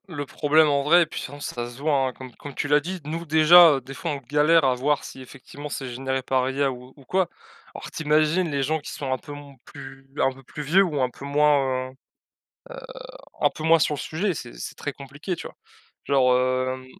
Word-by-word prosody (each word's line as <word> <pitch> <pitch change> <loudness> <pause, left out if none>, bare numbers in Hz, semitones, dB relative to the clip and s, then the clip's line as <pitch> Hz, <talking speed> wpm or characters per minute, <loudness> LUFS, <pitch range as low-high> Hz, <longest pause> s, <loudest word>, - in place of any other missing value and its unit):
le 145 0 -3
problème, 155 +3 +3
en 140 -1 +1
vrai 170 +4 +5
et - - -4
puis - - -7
sinon, 145 +2 -8
ça 120 -4 -5
se 120 - -13
voit, 140 -3 +1
hein 130 - -4
Comme 130 -1 -11
comme 145 - -10
tu - - -2
l'as 145 0 +4
dit, 180 +5 -6
nous, 165 +3 -4
déjà, 160 +2 +7
heu, 135 - -3
des 135 +2 -10
fois, 165 +4 -4
on 145 - -2
galère 150 +5 +3
à 130 -1 +3
voir 140 +3 0
si, 130 - -10
effectivement, 135 +3 -10
c'est 135 -2 -5
généré 130 +2 -3
par 130 0 0
IA 135 0 0
ou 125 +1 -11
ou 140 - -18
quoi, 185 +4 0 0.4
alors - - -8
tu 160 - -6
imagines 155 +3 +2
les 140 -1 -1
gens 155 +4 0
qui 145 - -9
sont 135 -2 -5
un - - -1
peu 145 - -11
m 145 -1 -11
plus 135 -1 -12
un 135 - +3
peu 135 0 -16
plus 150 - -8
vieux 175 +7 +4
ou 150 -7 -2
un 130 - +1
peu 135 - -11
moins, 140 -3 +2
heu - - -13
heu, - - -21 1.5
un - - +3
peu 155 - -9
moins 165 +1 +5
sur 150 - +1
le 140 - -5
sujet, 180 +4 -2
c'est 120 -5 -8
c'est - - -7
très 145 - -5
compliqué, 140 +7 -6
tu - - -8
vois? - - -11 0.5
Genre 130 -2 +3
hem 130 0 -1
140 Hz, 245 wpm, -24 LUFS, 130-155 Hz, 1.5 s, déjà